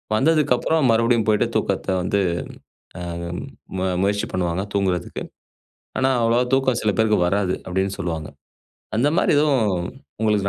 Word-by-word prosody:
வந்ததுக்கப்புறம் 150 +1 +2
மறுபடியும் 115 0 +3
போய்ட்டு 105 -1 +3
தூக்கத்த - - 0
வந்து 100 +3 0 0.8
அ - - -6 0.8
மு 95 - -1 0.2
முயற்சி 100 +1 +1
பண்ணுவாங்க, 90 0 -1
தூங்குறதுக்கு. 95 -3 -1 0.8
ஆனா, 130 0 +3
அவ்வளோவா 115 +2 +3
தூக்கம் 130 -3 +2
சில 105 - +2
பேருக்கு 110 -2 +3
வராது. 95 0 +1
அப்படீன்னு 95 +1 -1
சொல்லுவாங்க. 80 -5 -3 0.7
அந்தமாரி 145 +10 +2
எதுவும் 135 -9 +3 0.5
உங்களுக்கு 105 -3 +2
110 Hz, 120 wpm, -22 LUFS, 95-125 Hz, 0.8 s, மறுபடியும்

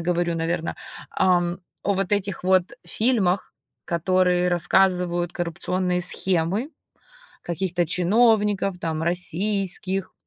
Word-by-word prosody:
говорю, 170 0 0
наверно. 165 0 -2 0.3
Ам, 175 -1 +1 0.2
о 200 - +1
вот 195 +1 -1
этих 200 -3 -1
вот 185 +4 +2
фильмах, 210 -6 +1 0.3
которые 180 +1 +1
рассказывают 175 0 +1
коррупционные 180 +1 -1
схемы 185 - 0 0.7
каких-то 175 -1 -1
чиновников 205 +1 +2
там 160 -2 -3
российских, 185 +2 -2
180 Hz, 95 wpm, -23 LUFS, 175-195 Hz, 0.7 s, вот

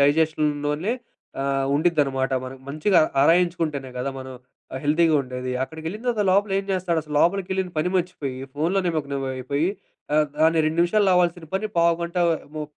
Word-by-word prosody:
డైజెషన్‌లోనే 150 +3 +1 0.5
ఆహ్, 135 0 0
ఉండిద్దనమాట. 145 -5 +1
మనకు 130 0 -9
మంచిగా 155 +6 +3 0.2
ఆరాయించుకుంటేనే 165 -4 +2
గదా! 125 +2 -2
మనం 130 0 -8 0.4
ఆహ్, 130 - -3
హెల్తీగా 160 +2 +3
ఉండేది. 125 0 -5
అక్కడికేళ్ళిన 160 - -7
తర్వాత 230 -4 +1
లోపల 200 +1 +2
ఏం 195 - -3
జేస్తాడసలు? 170 -5 -1
లోపలికేళ్ళిన 190 0 +1
పని 155 +4 +1
మర్చిపోయి, 170 -8 -3 0.2
ఫోనులో 165 +7 +1
నిమగ్నమయిపోయి 140 -1 -2 0.5
ఆహ్, 155 0 +4
దాన్ని 160 +1 +4
2 155 +2 -1
నిమిషాలో 195 +3 +3
అవాల్సిన 175 -2 +1
పని, 205 +3 0
పావుగంట 170 +1 +1 0.4
ము 155 - -3
160 Hz, 135 wpm, -23 LUFS, 140-180 Hz, 0.5 s, ఆహ్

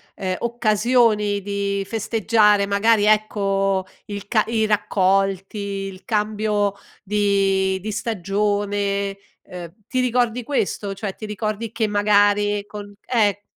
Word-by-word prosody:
ehm, 185 -1 -2
occasioni 220 -2 +2
di 200 0 -2
festeggiare, 215 -1 +2
magari, 205 +1 +3
ecco, 195 -3 +1 0.2
il 205 -1 -7
ca 215 0 +2
i 225 -1 +1
raccolti, 195 -1 +1
il 195 -2 -5
cambio 210 -2 0 0.3
di 195 -2 +1
di 215 - -4
stagione, 200 -1 -1 0.3
ehm, 175 -2 -9
ti 255 - 0
ricordi 245 -1 0
questo? 205 -6 -2
Cioè, 195 0 -5
ti 215 - -8
ricordi 215 +1 -4
che 225 -2 0
magari 205 0 +2
con 205 -1 -9
eh. 205 -4 +1
205 Hz, 115 wpm, -21 LUFS, 200-215 Hz, 0.3 s, magari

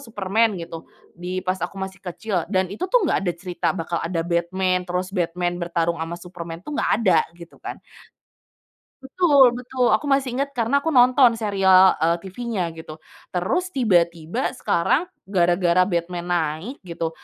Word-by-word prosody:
Superman 220 -3 0
gitu, 165 -1 -8 0.2
di 180 +2 -5
pas 185 -1 -1
aku 175 +3 -4
masih 190 -1 -6
kecil 185 -1 -3
dan 190 -1 0
itu, 365 - -4
tuh, 480 -1 +3
nggak 295 - +1
ada - - +1
cerita 175 -1 -3
bakal 165 +1 -3
ada 165 -1 -2
Batman 180 +2 0
terus 180 +2 -3
Batman 175 -1 -2
bertarung 170 -1 -1
sama 165 +1 -4
Superman, 170 -1 -9
tuh, 300 - -7
nggak - - 0
ada 190 -7 +4 0.2
gitu, 170 -1 -14
kan. - - -6 1.3
Betul 275 -2 +4
betul. 250 0 0
Aku 215 +7 +1
masih 275 -2 +1
ingat 280 0 -2
karena 240 +4 +1
aku 320 +1 -2
nonton 250 -1 +6
serial, 190 -3 +4
eee, 170 +2 +1
TVnya 195 -3 -3
gitu. 160 -1 -11 0.3
Terus 190 - 0
tiba-tiba 175 -1 +1
sekarang 275 - 0 0.2
gara-gara 175 -1 +3
Batman 175 -1 -2
naik 170 - -2
gitu, 165 -1 -3
185 Hz, 155 wpm, -22 LUFS, 170-230 Hz, 1.3 s, nonton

